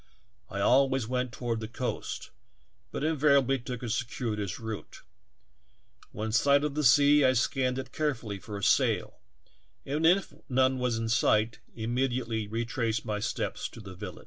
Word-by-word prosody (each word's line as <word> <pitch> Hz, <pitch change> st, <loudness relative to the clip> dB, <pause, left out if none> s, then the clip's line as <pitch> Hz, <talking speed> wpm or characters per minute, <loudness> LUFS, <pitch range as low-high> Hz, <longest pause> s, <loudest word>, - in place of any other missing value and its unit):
I -, -, -4 dB
always 135 Hz, -2 st, +3 dB
went 125 Hz, 0 st, -1 dB
toward 115 Hz, 0 st, -3 dB
the 110 Hz, -, -5 dB
coast, 125 Hz, +2 st, -4 dB, 0.6 s
but -, -, -4 dB
invariably 140 Hz, -4 st, +3 dB
took 125 Hz, 0 st, -6 dB
a -, -, -3 dB
cir 120 Hz, +1 st, -1 dB
cuitous 105 Hz, -6 st, -3 dB
route; 110 Hz, -2 st, -7 dB, 1.1 s
when 110 Hz, +2 st, -4 dB
in -, -, -3 dB
sight 140 Hz, +5 st, +4 dB
of 150 Hz, -1 st, -1 dB
the 150 Hz, +1 st, -1 dB
sea 145 Hz, +3 st, +6 dB
I 130 Hz, 0 st, +5 dB
scanned 130 Hz, +1 st, +1 dB
it 130 Hz, -1 st, -5 dB
carefully 120 Hz, -10 st, -2 dB
for 105 Hz, +1 st, -7 dB
a 100 Hz, -, -7 dB
sail, -, -, +2 dB, 0.7 s
and 150 Hz, +3 st, -2 dB
if 190 Hz, +3 st, +3 dB, 0.2 s
none 130 Hz, 0 st, +2 dB
was 125 Hz, -2 st, 0 dB
in 115 Hz, 0 st, -2 dB
sight, 110 Hz, 0 st, +2 dB, 0.2 s
immediately 120 Hz, -1 st, -1 dB
retraced 115 Hz, 0 st, -2 dB
my 105 Hz, -1 st, -2 dB
steps -, -, -3 dB
to -, -, -12 dB
the 100 Hz, -3 st, -9 dB
village. 90 Hz, -, -8 dB
125 Hz, 165 wpm, -29 LUFS, 110-135 Hz, 1.1 s, sea